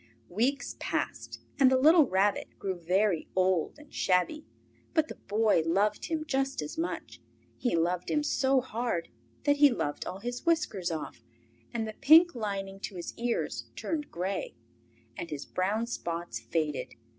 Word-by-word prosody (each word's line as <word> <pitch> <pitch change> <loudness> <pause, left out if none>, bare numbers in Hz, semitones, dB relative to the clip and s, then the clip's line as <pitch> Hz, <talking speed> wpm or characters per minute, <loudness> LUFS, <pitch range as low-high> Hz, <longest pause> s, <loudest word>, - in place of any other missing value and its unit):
Weeks 250 +9 0
passed, - - -3 0.2
and 265 -2 +7
the 260 - +5
little 310 +2 +6
Rabbit 195 +1 +1
grew 195 -1 -2
very 180 0 +1
old 185 - +1
and 295 0 -16
shabby, 185 - +1 0.5
but 315 -1 +3
the - - -6
Boy 210 -3 +2
loved 200 +6 +1
him 315 -1 -2
just 270 -2 -1
as 150 - -6
much. 330 +1 -4 0.4
He 245 - +1
loved 175 +2 0
him 300 -1 +1
so 270 -2 +2
hard 235 -8 -2 0.3
that 290 0 +3
he 290 0 +7
loved 145 - -2
all 185 - -4
his 245 +2 -4
whiskers 300 - +1
off, 160 -2 -5 0.5
and 225 -2 -2
the 215 - -5
pink 320 +8 +7
lining 195 -4 -4
to 195 - -6
his 175 - -6
ears 235 0 -2
turned 305 -2 -3
grey, 185 +3 -3 0.6
and 170 - -6
his 145 -2 -5
brown 205 +5 0
spots 170 -7 -4
faded. 155 -3 -2
215 Hz, 155 wpm, -30 LUFS, 180-275 Hz, 0.6 s, and